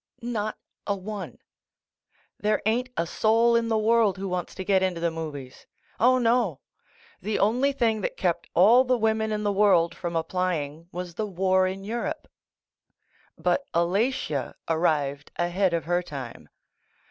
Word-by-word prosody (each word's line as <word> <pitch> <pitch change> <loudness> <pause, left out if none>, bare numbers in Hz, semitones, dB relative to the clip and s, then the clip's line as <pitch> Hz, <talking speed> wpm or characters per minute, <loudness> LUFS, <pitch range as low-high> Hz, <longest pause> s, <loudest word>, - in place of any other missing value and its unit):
Not 215 -3 -3 0.3
a 200 - +1
one. 200 +1 -7 1.0
There 210 0 0
ain't 240 +4 +1
a 165 - +1
soul 225 +6 +3
in 230 0 +2
the 225 -1 +1
world 220 -2 +3
who 195 +1 -4
wants 180 -1 -4
to 190 - -5
get 190 0 +2
into 185 -2 0
the 170 0 0
movies. 150 -5 -7 0.3
C)li, 255 +2 +5
no! 230 - +2 0.6
The 210 +2 -1
only 245 +7 +2
thing 230 -5 0
that - - -3
kept 175 -3 -1
all 225 +9 +7
the 255 -1 +1
women 220 -1 +1
in 210 0 -2
the 205 - +1
world 195 -4 +3
from 175 -2 -5
applying 165 -2 -2
was 180 0 -6
the 215 +5 -3
war 185 0 +2
in 190 +1 -5
Europe. 240 +9 -4 1.1
But 280 - +1
Alatia 180 - 0
arrived 150 -4 0
ahead 175 +2 +1
of 165 -3 -1
her 175 +1 +1
time. 135 -8 -8
195 Hz, 155 wpm, -26 LUFS, 170-220 Hz, 1.1 s, all